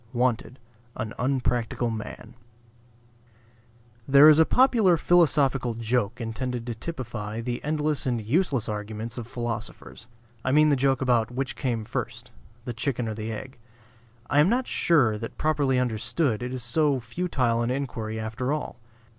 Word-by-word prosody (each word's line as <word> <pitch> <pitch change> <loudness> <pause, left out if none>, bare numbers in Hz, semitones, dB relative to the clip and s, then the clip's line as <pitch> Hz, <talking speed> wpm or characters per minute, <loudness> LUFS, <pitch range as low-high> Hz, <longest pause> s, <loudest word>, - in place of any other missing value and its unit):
WANTED, 125 +1 0 0.4
AN 110 -1 -4
UNPRACTICAL 125 -2 0
MAN 110 +2 -7 1.7
There 140 +2 +8
is 155 0 +6
a 160 - +7
popular 230 -9 +4
philosophical 140 -8 +2
joke 115 0 -1
intended 120 +1 -4
to 120 - -3
typify 115 -5 -6
the 120 +1 -4
endless 150 -1 -1
and 120 -2 0
useless 130 - 0
arguments 110 +2 -5
of 115 - -7
philosophers; 120 -1 -6 0.4
I 130 - 0
mean 155 +1 +5
the 145 - +4
joke 135 -1 +1
about 120 -4 +2
which 130 +2 -3
came 120 -5 -2
first, - - -5 0.3
the 120 - -4
chicken 120 0 -2
or 110 - -3
the 110 +1 -5
egg? 130 +4 -8 0.7
I 145 - +2
am 150 +5 +5
not 250 +3 +1
sure 125 - +2
that 115 - -7
properly 145 -4 +1
understood, 120 +1 0
it 125 0 -4
is 130 -2 -2
so 140 +3 +2
futile 125 -2 -1
an 120 - 0
inquiry 115 -5 -3
after 110 +4 -3
all. 150 -5 -4
125 Hz, 150 wpm, -26 LUFS, 115-140 Hz, 1.7 s, There